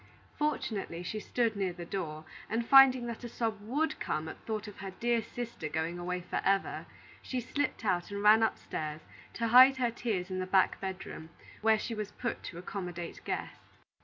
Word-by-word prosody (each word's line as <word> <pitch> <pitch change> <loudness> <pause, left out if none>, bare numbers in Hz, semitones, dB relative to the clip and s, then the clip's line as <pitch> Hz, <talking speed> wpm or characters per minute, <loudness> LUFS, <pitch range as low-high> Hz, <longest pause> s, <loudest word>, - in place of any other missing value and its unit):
Fortunately 215 - -2
she 215 +4 -3
stood 230 +1 0
near 190 -3 -1
the 175 -1 -8
door, 160 -4 -4 0.2
and 230 +1 0
finding 260 -1 +7
that 235 0 -6
a 240 - -5
sob 225 -3 -2
would 295 +9 -1
come 155 +1 -2
at - - -9
thought 215 -1 -3
of 205 - -10
her 195 0 -5
dear 235 +4 0
sister 230 -7 -6
going 160 +3 -2
away 180 +1 -2
forever, 195 +2 0 0.3
she 255 - -3
slipped 255 0 -2
out 180 -3 +1
and 200 0 -4
ran 215 +2 +7
upstairs 155 -8 -2 0.3
to 230 -1 -1
hide 260 +3 +9
her 245 -2 +1
tears 205 -6 -2
in 185 - -2
the 185 - -2
back 190 0 +3
bedroom, 190 -4 -6 0.3
where 220 0 +5
she 230 - -4
was 215 -2 -4
put 245 - -3
to 170 - -8
accommodate 175 -2 -6
guests. - - -5
210 Hz, 185 wpm, -31 LUFS, 180-235 Hz, 0.3 s, hide